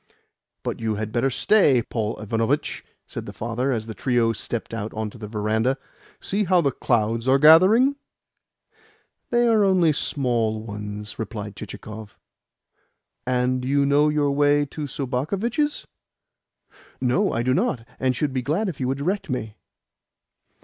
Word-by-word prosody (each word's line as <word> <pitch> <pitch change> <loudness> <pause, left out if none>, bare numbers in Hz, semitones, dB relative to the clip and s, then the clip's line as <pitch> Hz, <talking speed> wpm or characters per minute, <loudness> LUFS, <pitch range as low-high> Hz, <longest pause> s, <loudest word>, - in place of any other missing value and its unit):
"But - - -3
you 110 -2 -1
had 110 +1 -4
better 120 +4 +1
stay, 135 - +3
Paul 110 -1 -3
Ivanovitch," 115 +7 -1 0.2
said - - -7
the - - -5
father 120 +4 -2
as 110 -3 -2
the 110 - -6
trio 120 -1 +1
stepped 115 +1 -5
out 110 -1 -4
on 110 -1 -3
to 120 - -14
the 105 - -6
verandah. 110 +5 0 0.4
"See 205 +2 -1
how 180 0 +4
the 140 -5 +2
clouds 115 -1 0
are 135 +1 +5
gathering!" 190 - +6 1.3
"They 240 0 +3
are 220 -2 +4
only 180 -5 +4
small 120 -7 0
ones," 105 -1 -7
replied 105 -2 -5
Chichikov. 105 0 -9 1.1
"And 125 0 +1
you 140 +2 +2
know 145 +2 +4
your 150 -1 +1
way 145 +1 +3
to 145 +1 -6
Sobakevitch's?" 190 - -2 1.1
"No, 130 +11 +1
I 115 - -1
do 130 +1 +2
not, 115 -3 0
and 130 -1 +1
should 145 +1 -1
be 130 - 0
glad 160 - -1
if 160 - -7
you 130 - -1
would 135 +1 -1
direct 180 +6 -2
me." 110 -5 -3
130 Hz, 150 wpm, -23 LUFS, 115-150 Hz, 1.3 s, gathering